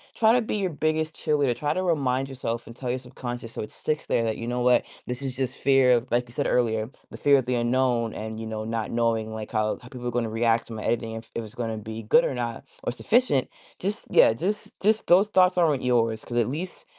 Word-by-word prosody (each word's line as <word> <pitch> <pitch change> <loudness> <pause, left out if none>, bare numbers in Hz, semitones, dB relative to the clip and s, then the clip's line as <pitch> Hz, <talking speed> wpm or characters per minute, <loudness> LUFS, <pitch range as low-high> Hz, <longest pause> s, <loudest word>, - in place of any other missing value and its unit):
try 220 -1 +5
to 245 - +4
be 215 - -3
your 190 -2 0
biggest 155 0 -1
cheerleader, 145 -5 +1
try 150 +4 -1
to 185 - -1
remind 135 -6 +1
yourself 120 -3 -4
and 115 - -9
tell 125 0 -5
your 125 - 0
subconscious 120 -2 -7
so - - -5
it 105 - -6
sticks 155 0 -3
there 115 - +2
that, 110 -1 -1
you 115 - -5
know 125 +1 -1
what? 125 0 +4 0.2
This 125 +2 -4
is 130 -2 -4
just 130 -1 -2
fear 135 -2 +4
of 120 +2 -4
like, 120 0 +1
you - - -14
said - - -1
earlier, 110 -2 +1 0.2
the - - -8
fear 140 -1 +5
of 130 - -1
the 125 0 0
unknown 120 -1 +1
and, 110 0 -6
you 110 - -5
know, 110 0 -4
not 115 0 -3
knowing, 115 -2 0
like, 110 -1 -6
how 110 -1 0
how 125 - -12
people 125 -1 -6
are - - -1
gonna 120 -1 -1
react 115 +1 +1
to 115 - -8
my 110 - -6
editing 115 -1 -1
if 115 0 -9
it 115 - -1
was 110 -2 -10
gonna 115 -2 -3
be 110 +1 -6
good 240 - +5
or - - -1
not 120 -2 -4 0.2
or - - 0
sufficient. 215 - +2 0.3
Just 200 +3 -3
yeah, - - +6
just 190 - -3
just 215 +2 +2
those 190 +4 +6
thoughts 185 -2 +4
aren't 155 -6 +3
yours, 115 -3 +1
'cause 120 - -4
at 120 - +3
least 165 +8 -5
125 Hz, 255 wpm, -26 LUFS, 115-145 Hz, 0.3 s, yeah